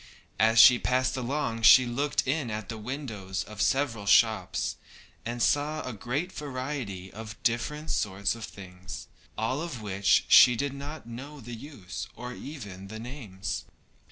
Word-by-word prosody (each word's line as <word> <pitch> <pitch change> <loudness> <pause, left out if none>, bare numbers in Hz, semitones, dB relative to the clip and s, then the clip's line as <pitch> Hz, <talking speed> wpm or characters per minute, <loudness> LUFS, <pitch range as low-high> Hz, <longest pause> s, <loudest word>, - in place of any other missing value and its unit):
As 110 +1 +4
she 125 -1 +9
passed 130 +1 +1
along 130 -2 -2
she 130 +3 +8
looked 135 +4 -1
in 135 -2 0
at 105 -2 -5
the 115 - -4
windows 110 -6 -4
of 105 -2 -7
several 115 -5 +1
shops, 110 +1 +3 0.5
and 120 0 -1
saw 150 +2 +1
a 125 - -4
great 130 - -3
variety 130 - -5
of 110 0 -8
different 150 +6 -1
sorts 100 -1 0
of 115 -1 -9
things, 95 -3 -9 0.3
of 130 +3 -2
which 100 -1 +2
she 125 - +8
did 140 +2 -2
not 145 +1 -7
know 135 +6 -8
the 120 -1 -9
use 110 - -7
or 125 +2 -6
even 105 -11 -8
the 110 +2 -7
names. 110 -6 -6
120 Hz, 150 wpm, -28 LUFS, 105-140 Hz, 0.5 s, she